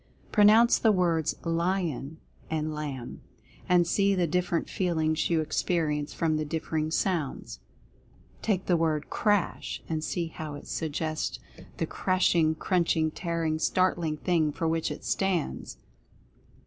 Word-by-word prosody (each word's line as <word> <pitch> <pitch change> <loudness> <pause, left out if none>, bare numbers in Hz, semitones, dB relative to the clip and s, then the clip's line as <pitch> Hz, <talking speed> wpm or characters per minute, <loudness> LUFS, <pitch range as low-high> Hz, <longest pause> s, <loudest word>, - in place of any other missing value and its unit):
Pronounce 215 +3 +6
the 220 - +4
words 170 -5 +1
"LION" 165 -4 -1 0.3
and 155 -1 -1
"LAMB," 140 -5 -5 0.5
and 175 -1 +5
see 200 +3 +2
the 180 -2 +2
differ 175 +2 0
ent - - -3
feelings 160 -4 0
you 165 -2 +2
experience 155 -2 -1
from 160 -2 0
the 155 - -1
differing 155 0 -2
sounds. 165 -4 -2 0.8
Take 195 -4 0
the 180 - +3
word 160 -2 0
"CRASH," 205 -4 0
and 155 -1 -2
see 170 0 -2
how 155 -2 -6
it - - -10
suggests 155 0 -2
2i6 - - -24
Mental - - -27
Fascination - - -18
the - - 0
crashing, 175 -4 +2
crunching, 165 -2 +1
tearing, 165 -2 -2
startling 175 -3 +1
thing 160 -2 +1
for 165 +3 -2
which 160 0 0
it - - -7
stands. 190 -5 -1
165 Hz, 145 wpm, -28 LUFS, 155-180 Hz, 0.8 s, Pronounce